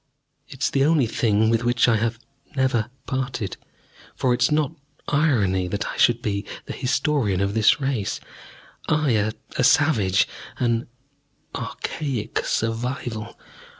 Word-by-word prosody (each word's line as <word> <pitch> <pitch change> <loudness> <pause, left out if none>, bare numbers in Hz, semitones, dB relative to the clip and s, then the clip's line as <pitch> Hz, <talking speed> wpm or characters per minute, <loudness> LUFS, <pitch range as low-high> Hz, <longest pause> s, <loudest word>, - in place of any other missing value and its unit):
It - - -7
is - - +2
the 135 - +2
only 150 -3 +4
thing 110 -1 +2
with 115 0 +1
which 120 0 +3
I 115 -2 +4
have 115 +1 -1 0.4
never 130 -4 +1 0.2
parted. 130 -6 -3 0.6
For 130 -3 +2
is 120 0 +3
it - - -7
not 150 -1 +2 0.4
irony 110 - +2
that 100 +4 -2
I - - -7
should 120 0 +3
be 100 -1 -1 0.2
the - - -6
historian 130 - 0
of 100 0 0
this 110 +7 +4
race 135 -7 -1 0.7
I, 155 -3 +2 0.4
a - - 0
savage, 110 -9 +4 0.3
an 120 -1 0 0.7
"archaic 135 -8 -3
survival?" 115 -1 -2
120 Hz, 135 wpm, -23 LUFS, 110-135 Hz, 0.7 s, only